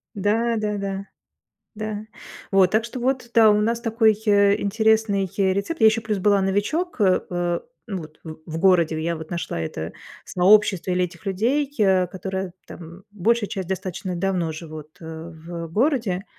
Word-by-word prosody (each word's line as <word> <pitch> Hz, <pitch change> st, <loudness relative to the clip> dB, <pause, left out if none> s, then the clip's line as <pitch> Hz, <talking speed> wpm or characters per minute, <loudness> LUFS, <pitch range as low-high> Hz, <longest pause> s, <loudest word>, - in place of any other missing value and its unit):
Да-да-да. 205 Hz, -2 st, -1 dB, 0.7 s
Да. 215 Hz, 0 st, -5 dB, 0.5 s
Вот. 190 Hz, -2 st, +4 dB
Так 220 Hz, +1 st, +2 dB
что 240 Hz, +2 st, -6 dB
вот 255 Hz, -1 st, -1 dB
да, 225 Hz, -2 st, +7 dB
у 210 Hz, 0 st, +3 dB
нас 230 Hz, +2 st, 0 dB
такой, 225 Hz, -1 st, +3 dB
э, 200 Hz, -1 st, +4 dB
интересный, 220 Hz, -1 st, +2 dB
э, 190 Hz, -1 st, +3 dB
рецепт. 235 Hz, +10 st, -3 dB
Я 220 Hz, -, +7 dB
еще 220 Hz, +1 st, +3 dB
плюс 215 Hz, -3 st, -2 dB
была 200 Hz, 0 st, +3 dB
новичок, 215 Hz, -, -1 dB
э, 190 Hz, -3 st, +4 dB
э, 175 Hz, -1 st, -1 dB, 0.3 s
вот, 160 Hz, -7 st, -7 dB
в 155 Hz, -1 st, -7 dB
в 160 Hz, 0 st, -5 dB
городе 170 Hz, -4 st, +3 dB
я 170 Hz, 0 st, -1 dB
вот 160 Hz, +2 st, -9 dB
нашла 170 Hz, -, -3 dB
это 80 Hz, 0 st, -5 dB, 0.3 s
сообщество 190 Hz, 0 st, +3 dB
или 180 Hz, 0 st, +2 dB
этих 170 Hz, -1 st, -9 dB
людей, 250 Hz, +9 st, 0 dB
э, 190 Hz, -3 st, +3 dB
которые, 190 Hz, 0 st, -5 dB
там, 170 Hz, +2 st, -11 dB
большая 210 Hz, +2 st, +1 dB
часть 190 Hz, -5 st, -5 dB
достаточно 185 Hz, -1 st, -4 dB
давно 180 Hz, -3 st, -1 dB
живут, 155 Hz, -1 st, -10 dB
э, 160 Hz, -, -10 dB, 0.2 s
в 165 Hz, +1 st, -8 dB
городе, 220 Hz, -, +1 dB
195 Hz, 160 wpm, -23 LUFS, 180-220 Hz, 0.7 s, да